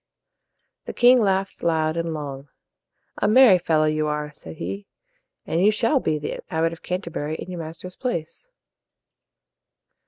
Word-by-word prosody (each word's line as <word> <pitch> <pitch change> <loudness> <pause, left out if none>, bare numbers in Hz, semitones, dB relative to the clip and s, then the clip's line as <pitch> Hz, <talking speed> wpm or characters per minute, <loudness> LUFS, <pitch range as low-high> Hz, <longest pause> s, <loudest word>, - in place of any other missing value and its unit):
The - - -6
king 250 +1 +6
laughed 195 -1 0
loud 160 -1 +1
and 165 0 -2
long. 140 -2 -6 0.7
"A - - +2
merry 215 -4 +7
fellow 160 -2 +2
you 155 0 0
are," 150 0 -3
said 80 - -10
he, 100 +5 -6 0.6
"and 170 +3 0
you 205 - +6
shall 230 +6 +2
be 155 - 0
the 150 - -5
Abbot 165 0 0
of 165 - -12
Canterbury 170 -4 -4
in 185 - -7
your 175 - -6
master's 165 +3 -8
place." 240 - -4
165 Hz, 150 wpm, -23 LUFS, 150-190 Hz, 0.7 s, merry